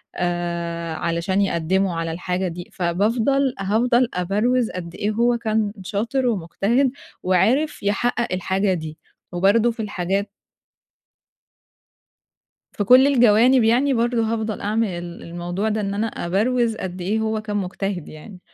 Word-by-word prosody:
آآ 170 -1 -2
علشان 170 +4 -1
يقدّموا 185 0 +1
على 165 0 -2
الحاجة 180 +2 -2
دي. 175 0 -7
فبافضل 225 +10 +1
هافضل 235 +5 +2
أبَروِز 215 +7 +1
قد 170 -1 -7
إيه 210 +1 -1
هو 235 +2 +2
كان 220 -2 0
شاطر، 230 +7 -1
ومجتهد، 225 +6 +1 0.3
وعرف 235 - +1
يحقق 235 +2 0
الحاجة 190 +1 0
دي. 155 -2 -5 0.3
وبرضه 200 +6 +3
في 230 - -13
الحاجات 195 0 -2 2.4
في 205 - -2
كل 255 +6 +7
الجوانب 245 -1 +5
يعني 250 +5 +3
برضه 235 -1 +1
هافضل 220 -2 -3
أعمل 215 +2 0
ال 175 -1 -7
الموضوع 175 +5 -3
ده، 215 0 -1
إن 200 0 -2
أنا 215 +3 -1
أبَروِز 225 +5 0
قد 185 -2 -6
إيه 205 +5 0
هو 220 0 -1
كان 210 -1 -3
مجتهد 195 -2 -4
يعني. 180 +5 -12
205 Hz, 135 wpm, -22 LUFS, 180-230 Hz, 2.4 s, كل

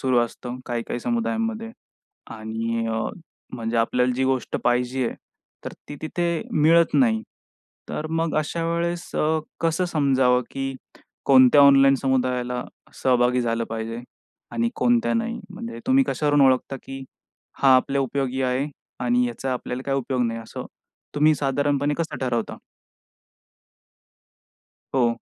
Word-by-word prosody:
सुरू 130 -2 +2
असतं 120 +1 -4
काही-काही 120 0 -3
समुदायांमध्ये 225 - -2 0.6
आणि 115 +1 -3
अ, 110 0 -1 0.5
म्हणजे 115 -1 -3
आपल्याला 125 +2 +2
जी 130 +1 0
गोष्ट 130 -1 0
पाहिजे 125 +1 +1
आहे, - - -7 0.5
तर - - -5 0.2
ती 145 - -7
तिथे 170 +1 -1
मिळत 165 +1 +4
नाही. 115 -5 +3 0.7
तर 155 - -4
मग 165 0 0
अशा 160 +2 -2
वेळेस 170 +1 -2
अ, 155 +1 +1 0.2
कसं 165 +2 +1
समजावं, 135 -6 +2
की 135 0 -3 0.5
कोणत्या 130 +1 +7
ऑनलाईन 135 -1 +7
समुदायाला 125 -2 -1 0.4
सहभागी 125 -1 +3
झालं 115 -1 -1
पाहिजे 115 +1 -4 0.5
आणि 235 0 0
कोणत्या 240 -1 +2
नाही? 230 0 -2
म्हणजे 230 +5 -7
तुम्ही 265 +1 +4
कशावरून 145 -1 +2
ओळखता 130 +1 +2
की 135 0 -8 0.6
"हा 135 -1 +7
आपल्या 140 +2 +1
उपयोगी 135 0 -1
आहे 130 +2 0 0.4
आणि 125 0 +2
याचा 130 +3 -3
आपल्याला 125 0 -4
काही 135 0 +1
उपयोग 130 -1 -1
नाही," 115 0 -3
असं 115 - -8 0.5
तुम्ही 150 +1 +4
साधारणपणे 145 +1 0
कसं 165 - -2
ठरवता? 120 -3 -2 2.4
हो. 120 -2 +2
135 Hz, 130 wpm, -24 LUFS, 125-155 Hz, 2.4 s, कोणत्या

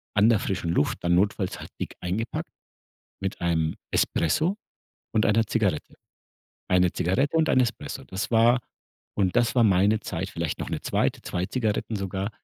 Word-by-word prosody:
an 105 +1 +5
der 115 -3 +4
frischen 95 -4 -2
Luft 75 - +1
dann 85 0 +2
notfalls 95 0 0
halt - - -9
dick - - -4
eingepackt 100 +7 -3 0.7
mit 95 - -3
einem 80 -2 0 0.2
Espresso 155 - +1 0.6
und 110 - +3
einer 110 +2 +3
Zigarette. 100 -8 -1 0.7
1 90 -1 +3
Zigarette 130 - +1
und 160 -1 +3
1 130 - +4
Espresso, 115 - -2
das 95 +1 -4
war 115 +2 +5 0.6
und 95 +1 +1
das 120 -1 +3
war 125 - +5
meine 100 +2 +4
Zeit 90 -1 -4
vielleicht 85 -2 -3
noch - - -4
'ne - - -2
2., - - 0
2 90 +1 -2
Zigaretten 110 -2 -1
sogar 95 +1 -3
100 Hz, 165 wpm, -26 LUFS, 90-115 Hz, 0.7 s, an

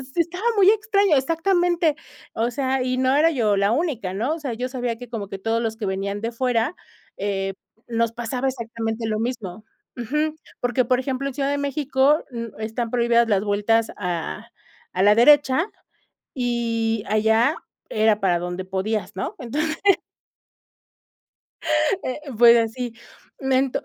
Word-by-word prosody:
estaba 345 +4 -1
muy 390 -1 +7
extraña, 405 -6 +3
exactamente, 335 +2 +1 0.4
o 230 +2 0
sea, 265 +1 0
y 255 0 -1
no 260 +1 +2
era 320 +3 +4
yo 220 -8 +1
la 200 +1 +2
única, 245 - -1
¿no? 245 +11 -1
O - - -8
sea, 275 -6 -4
yo 250 +3 -3
sabía 245 -2 -2
que, 245 -1 -10
como 220 -4 -5
que 195 - -6
todos 225 +3 0
los 225 -1 -2
que 220 - -4
venían 200 +1 -3
de 230 +1 -2
fuera, 245 +4 0 0.4
eh, 195 -1 -2 0.3
nos 230 -1 0
pasaba 245 +3 -2
exactamente 230 -2 -4
lo 215 -1 -1
mismo. 220 -4 -4 0.3
Ujú. 300 +6 -1 0.3
Porque, 245 0 +1
por 250 +1 +2
ejemplo, 270 0 -2
en 275 - -4
Ciudad 275 -1 0
de 285 - 0
México 280 +1 +2
n 230 -2 -5
están 225 +1 -3
prohibidas 235 -1 +3
las 200 -2 +2
vueltas 210 +2 +1
a 170 - -4 0.4
a 185 - +1
la 205 +1 +6
derecha 290 - +5 0.7
y 230 -3 -1
allá 220 +6 +3 0.3
era 215 -1 +2
para 180 -3 +2
donde 180 +1 -4
podías, 195 +1 -2
¿no? 190 - -4
Entonces. 300 +6 -2 2.3
Eh, 255 +3 -4 0.2
pues 235 0 +8
así, 230 +1 -2 0.5
bueno, 265 0 +2
235 Hz, 155 wpm, -23 LUFS, 220-270 Hz, 2.3 s, pues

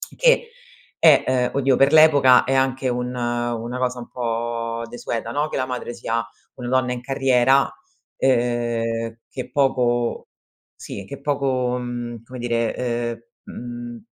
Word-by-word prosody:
che 485 -1 +3 0.5
è, - - +6
uhm 125 -1 +2
oddio, 135 -1 +3
per 135 +2 +4
l'epoca 145 -5 +6
è 135 - 0
anche 130 0 +1
un 125 0 -2
una 120 0 -2
cosa 125 -1 -1
un 120 - -8
po' 115 -1 -3
desueta, 115 -1 -4
no, 150 +3 -1
che - - -3
la 130 - 0
madre 125 -1 -5
sia 115 0 -2 0.3
una 125 -1 -6
donna 130 -1 +1
in 120 - -6
carriera, 135 0 +3 0.5
uhm, 120 -2 0
che 130 - -7
poco 125 -4 +1 0.5
sì 100 - -8
che 140 +8 -9
poco 135 -3 0
mhmm, 120 -2 -5
come 125 +1 -10
dire, 120 0 -2 0.2
uhm - - -11 0.4
mhmm, 115 - -11
125 Hz, 145 wpm, -22 LUFS, 120-130 Hz, 0.5 s, è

